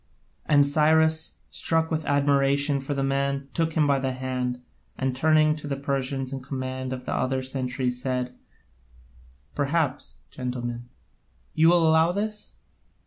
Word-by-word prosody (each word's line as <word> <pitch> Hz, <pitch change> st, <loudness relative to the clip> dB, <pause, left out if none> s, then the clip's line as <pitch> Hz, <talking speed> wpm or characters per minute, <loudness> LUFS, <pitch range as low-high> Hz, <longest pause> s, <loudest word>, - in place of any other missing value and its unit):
And 145 Hz, -1 st, +5 dB
Cyrus, 160 Hz, +2 st, +2 dB, 0.2 s
struck 160 Hz, 0 st, 0 dB
with 160 Hz, -1 st, -1 dB
admiration 140 Hz, 0 st, +2 dB
for 135 Hz, +2 st, -3 dB
the 135 Hz, -, -1 dB
man, 140 Hz, 0 st, -1 dB
took 165 Hz, -1 st, 0 dB
him 155 Hz, -1 st, +3 dB
by 140 Hz, -1 st, +2 dB
the 130 Hz, -1 st, -1 dB
hand, 125 Hz, -1 st, -3 dB, 0.4 s
and 130 Hz, -1 st, -1 dB
turning 155 Hz, +2 st, +4 dB
to 150 Hz, -, -7 dB
the 140 Hz, -, -1 dB
Persians 135 Hz, -1 st, -2 dB
in 135 Hz, -, -4 dB
command 130 Hz, -1 st, -4 dB
of 125 Hz, -1 st, -5 dB
the -, -, -2 dB
other 130 Hz, 0 st, 0 dB
centuries 130 Hz, -1 st, -2 dB
said: 125 Hz, -1 st, -2 dB, 1.2 s
"Perhaps, 145 Hz, -1 st, -1 dB
gentlemen, 120 Hz, -1 st, -5 dB, 0.6 s
you 160 Hz, +1 st, +5 dB
will 170 Hz, -2 st, +5 dB
allow 160 Hz, +2 st, +4 dB
this?" 210 Hz, +2 st, -3 dB
140 Hz, 140 wpm, -25 LUFS, 130-155 Hz, 1.2 s, And